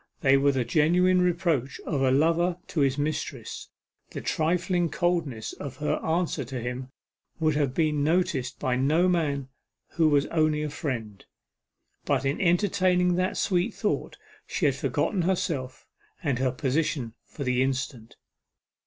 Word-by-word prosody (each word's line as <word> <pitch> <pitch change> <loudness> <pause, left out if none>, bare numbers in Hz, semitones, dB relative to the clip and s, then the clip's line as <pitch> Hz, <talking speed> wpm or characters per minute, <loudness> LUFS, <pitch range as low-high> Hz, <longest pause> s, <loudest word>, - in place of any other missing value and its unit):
They 135 -1 +5
were 140 +1 +4
the 130 -3 -1
genuine 180 +7 +3
reproach 170 -7 0
of 140 -4 -1
a 135 - +3
lover 165 +6 +2
to 160 - -2
his 135 -1 +2
mistress; 145 -5 -4 0.4
the - - -6
trifling 175 +2 0
coldness 160 -9 -1
of 140 -3 -7
her 150 - 0
answer 165 -2 0
to 130 +1 -5
him 125 +2 -5 0.5
would 155 -1 +2
have 140 -3 0
been 150 -3 +1
noticed 145 -6 0
by 125 -1 0
no 155 +7 +3
man 145 -7 0 0.4
who 160 -2 +2
was 145 -1 +3
only 155 -2 +1
a 150 - -3
friend. 120 - -4 0.8
But, - - 0
in 135 +2 0
entertaining 180 0 +3
that 185 +1 0
sweet 185 +4 0
thought, 210 - -2 0.3
she - - -1
had - - +4
forgotten 195 - -1
herself, 170 -8 -2 0.4
and 140 -6 0
her 130 -1 +1
position 130 -2 -1
for 145 - -7
the 125 -1 +1
instant. 130 -3 -2
150 Hz, 150 wpm, -27 LUFS, 130-175 Hz, 0.8 s, They